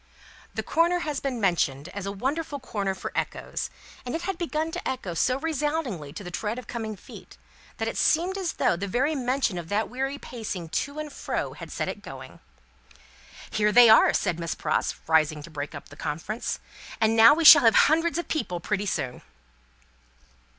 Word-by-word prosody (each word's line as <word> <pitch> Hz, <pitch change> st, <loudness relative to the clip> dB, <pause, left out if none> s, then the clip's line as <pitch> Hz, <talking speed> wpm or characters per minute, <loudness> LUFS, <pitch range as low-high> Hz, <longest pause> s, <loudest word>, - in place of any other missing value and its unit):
The -, -, -2 dB
corner 345 Hz, +2 st, +2 dB
has 300 Hz, -4 st, -2 dB
been 265 Hz, -4 st, -3 dB
mentioned 165 Hz, -7 st, 0 dB
as 200 Hz, 0 st, -6 dB
a -, -, -2 dB
wonderful 285 Hz, +8 st, -3 dB
corner 200 Hz, -6 st, -3 dB
for -, -, -6 dB
echoes; -, -, -3 dB, 0.3 s
it 250 Hz, +6 st, -3 dB
had 375 Hz, -1 st, -3 dB
begun 320 Hz, -2 st, -2 dB
to -, -, -5 dB
echo 250 Hz, -9 st, -3 dB
so 255 Hz, +10 st, +1 dB
resoundingly 295 Hz, -, -2 dB
to 205 Hz, -, -7 dB
the 180 Hz, -, -7 dB
tread 215 Hz, +5 st, -3 dB
of 250 Hz, -, -7 dB
coming 220 Hz, -2 st, -5 dB
feet, -, -, -13 dB, 0.4 s
that -, -, -2 dB
it -, -, -3 dB
seemed 350 Hz, +4 st, +2 dB
as 380 Hz, -4 st, -2 dB
though -, -, +2 dB
the 195 Hz, +4 st, -4 dB
very 265 Hz, +10 st, +1 dB
mention 255 Hz, -, 0 dB
of 165 Hz, -1 st, -9 dB
that 210 Hz, +2 st, 0 dB
weary 270 Hz, +2 st, -2 dB
pacing 210 Hz, -, -6 dB
to 285 Hz, -, -2 dB
and 305 Hz, -1 st, -5 dB
fro -, -, -3 dB
had -, -, -10 dB
set -, -, -2 dB
it 205 Hz, -, -5 dB
going. 130 Hz, -8 st, -10 dB, 1.1 s
"Here 210 Hz, -1 st, +2 dB
they 240 Hz, +1 st, +8 dB
are!" 220 Hz, -, +7 dB
said 170 Hz, -1 st, -1 dB
Miss 170 Hz, -1 st, -3 dB
Pross, -, -, -1 dB
rising 155 Hz, -2 st, +2 dB
to 170 Hz, -, -11 dB
break 145 Hz, -1 st, -5 dB
up -, -, -10 dB
the -, -, -13 dB
conference; 195 Hz, +10 st, -4 dB, 0.4 s
"and 225 Hz, 0 st, +3 dB
now 230 Hz, +4 st, +8 dB
we 330 Hz, 0 st, 0 dB
shall -, -, +11 dB
have 225 Hz, -2 st, +5 dB
hundreds 330 Hz, +2 st, +2 dB
of 345 Hz, -, -3 dB
people 180 Hz, -, -2 dB
pretty 205 Hz, +3 st, -2 dB
soon!" 130 Hz, -8 st, -3 dB
225 Hz, 190 wpm, -26 LUFS, 180-295 Hz, 1.1 s, shall